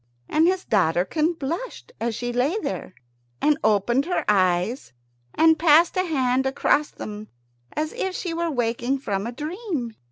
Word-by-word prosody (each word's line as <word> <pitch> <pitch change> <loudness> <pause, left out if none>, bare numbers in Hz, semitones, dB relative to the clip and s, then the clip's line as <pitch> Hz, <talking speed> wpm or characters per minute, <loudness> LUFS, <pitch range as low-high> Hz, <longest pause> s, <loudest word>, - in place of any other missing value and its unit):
And 320 +2 +3
his 370 0 0
daughterkin 200 - +1
blushed 340 - -5
as 235 -1 -1
she 245 +1 -3
lay 265 - +1
there, 310 - -5 0.4
and 300 0 +2
opened 220 +6 +2
her 360 - -1
eyes, 185 - +1 0.4
and 320 -1 +5
passed 330 +1 +5
a 370 - +2
hand 265 -5 +1
across 290 +2 +1
them, 210 0 -8 0.5
as 310 0 -2
if 380 -1 -3
she 350 -3 -3
were 335 0 -1
waking 240 0 -1
from 205 -5 -3
a - - -4
dream. 300 - -4
270 Hz, 155 wpm, -24 LUFS, 230-330 Hz, 0.5 s, and